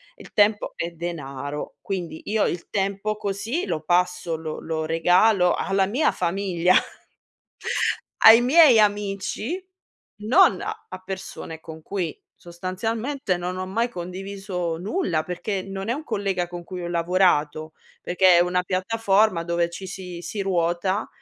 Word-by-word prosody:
Il - - -14
tempo 205 0 +2
è 170 +1 -3
denaro, 150 -4 -6
quindi 175 -5 -5
io 215 0 +1
il 175 - -4
tempo 200 +2 -1
così 215 - -2
lo 155 - -2
passo 175 0 +1
lo 155 -1 -5
lo 160 -1 -3
regalo 180 +4 +4
alla 195 0 +1
mia 260 +9 +2
famiglia, 180 0 +1 1.5
ai 225 +1 +10
miei 265 -2 +7
amici, 210 - -1 0.6
non 255 - +5
a 430 - -7
persone 190 -4 -7
con 160 -1 -10
cui 180 -3 -4 0.2
sostanzialmente 215 +7 -3
non 180 +1 -4
ho 185 - -2
mai 230 +6 0
condiviso 185 -2 -5
nulla, 180 - -1
perché 190 +3 -3
non 195 +1 -6
è - - +2
un 290 +5 -4
collega 195 - -2
con 175 0 -8
cui 180 0 -7
ho 175 - -4
lavorato, 165 -3 +1 0.3
perché 180 0 +4
è - - +6
una 180 +1 0
piattaforma 195 -1 +1
dove 170 0 0
ci 190 +2 -7
si 180 -2 -7
si 205 +4 -5
ruota 185 +2 0
185 Hz, 140 wpm, -24 LUFS, 170-205 Hz, 1.5 s, ai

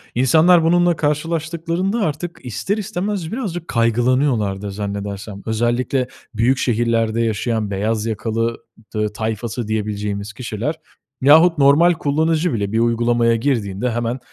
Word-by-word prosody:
İnsanlar, 160 +7 +5
bununla 175 +1 +3
karşılaştıklarında 165 +6 -1
artık 170 -1 -3
ister 180 - -2
istemez 200 -4 -3
birazcık 185 -9 -4
kaygılanıyorlardır 115 -3 +1
zannedersem. 100 0 -5
Özellikle 120 +3 0 0.3
büyük 120 +4 +2
şehirlerde 115 -2 +1
yaşayan 110 -1 -1
beyaz 105 +2 -1
yakalı 115 +1 -2 0.4
t 105 -1 -1
tayfası 110 +1 -3
diyebileceğimiz 105 -1 -3
kişiler, 120 +5 -3 0.5
yahut 160 +5 +6
normal 145 +5 +5
kullanıcı 160 +1 0
bile 100 -3 -2
bir 115 - +1
uygulamaya 120 0 +2
girdiğinde, 115 -3 -1
hemen 120 +2 -2
120 Hz, 115 wpm, -19 LUFS, 110-160 Hz, 0.5 s, yahut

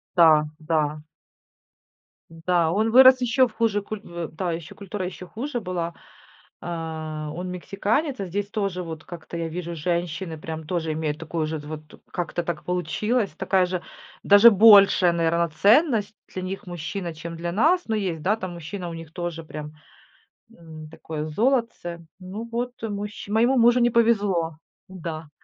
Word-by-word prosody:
Да, 160 -3 +6
да. 155 -1 -1 1.3
Да, 165 0 +1
он 220 +4 +1
вырос 260 +1 +8
ещё 250 +2 +3
в 235 - -16
хуже 220 -3 +1
куль 210 +1 -6
в, 170 -4 -6
да, 175 +2 -3
ещё 165 -1 -6
культура 200 -1 -5
ещё 180 0 -7
хуже 245 +6 -4
была. 180 -4 -3 0.7
Э, - - -9 0.7
он 180 +1 -5
мексиканец, 210 - -1
а 195 - -2
здесь 200 +3 -3
тоже 195 -4 -2
вот 160 -2 -7
как-то 170 -1 -9
я 165 -1 -2
вижу, 170 +1 -5
женщины 170 +1 -2
прям 160 0 -6
тоже 165 -2 -2
имеют 155 -1 -2
такую 165 -1 -3
же 160 0 -3
вот, 150 +1 -7 0.3
как-то 175 0 -3
так 170 -2 -4
получилось. 210 +5 0
Такая 190 -1 +2
же, 180 -1 -3 0.4
даже 205 +3 +8
большая, 200 -4 +7
наверно, 170 0 +1
ценность 215 - +3
для 185 - -6
них 190 +1 -5
мужчина, 175 0 -5
чем 165 +1 -7
для 170 +1 -4
нас. 325 - +3
Но 225 - -1
есть, 185 -7 -2
да, 205 +6 +2
там 185 -4 -6
мужчина 175 +2 -6
у 170 - -6
них 165 -1 -9
тоже 170 -2 -5
прям, 150 -1 -8 0.8
м, 160 -2 -11
такое 155 -1 -6
золотце. 205 - -1
Ну 195 +5 -7
вот, 245 +1 -2
мужч 210 -1 -5
моему 235 +5 +3
мужу 240 +1 +5
не 240 0 +4
повезло. 200 -9 +2 0.3
Да. 165 -4 -7
180 Hz, 160 wpm, -24 LUFS, 165-210 Hz, 1.3 s, вырос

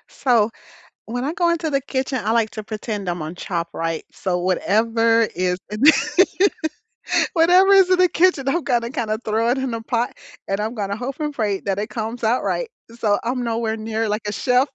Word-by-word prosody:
So, 230 -4 +2 0.6
when 245 +3 -3
I 300 - -1
go 345 0 +2
into 335 -1 -1
the 275 -1 +1
kitchen, 260 -1 -2
I 220 - +1
like 230 -2 +2
to 215 - -6
pretend 210 -2 -5
I'm 175 -1 -2
on 155 +2 -6
Chopped, 170 -2 -4
right? 165 -1 -3
So, 180 -2 -2
whatever 225 +5 +2
is 180 0 0
in 210 +1 -5
the 305 +3 +9 1.4
whatever 360 +4 +5
is 385 -2 +6
in 370 - +4
the 365 - +5
kitchen, 335 -7 +2
I'm 330 +4 +1
gonna 235 -2 0
kinda 220 -5 -2
throw 220 +2 +1
it 250 - +2
in 265 -2 -2
a 230 - -3
pot 235 +1 -2 0.3
and 195 +1 -1
I'm 220 +3 -3
gonna 200 -2 -2
hope 255 +6 -5
and 300 -1 -2
pray 210 -6 -1
that 195 0 -2
it 215 +2 -3
comes 225 +2 -5
out 230 +3 +2
right. - - -1 0.3
So, 205 -2 +2
I'm 245 +1 -2
nowhere 225 -1 -1
near 220 0 -2
like 210 +1 -2
a 205 - -1
chef. 250 +5 +2
230 Hz, 205 wpm, -21 LUFS, 210-265 Hz, 1.4 s, the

